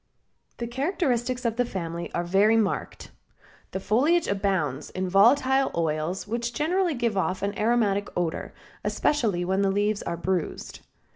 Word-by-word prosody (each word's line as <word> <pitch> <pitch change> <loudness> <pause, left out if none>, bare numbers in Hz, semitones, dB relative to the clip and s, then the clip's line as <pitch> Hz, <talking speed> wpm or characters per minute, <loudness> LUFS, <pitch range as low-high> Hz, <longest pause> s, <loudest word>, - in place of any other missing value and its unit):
The 235 - -3
characteristics 255 -2 -1
of 230 0 0
the 245 - +3
family 170 -6 -5
are 175 - 0
very 200 +5 +4
marked. 215 -3 -2 0.6
The 190 - -4
foliage 270 - +2
abounds 190 -9 -1
in 185 0 -3
volatile 260 +8 +4
oils 165 +4 -1
which 235 +2 -3
generally 345 +3 +1
give 235 -3 0
off 190 0 -1
an 200 +1 -1
aromatic 210 -3 +1
odor, 170 -2 -2 0.3
especially 215 -12 0
when 190 +2 +1
the 195 - +2
leaves 205 +1 0
are 170 - -4
bruised. 180 -1 -3
205 Hz, 145 wpm, -26 LUFS, 185-240 Hz, 0.6 s, very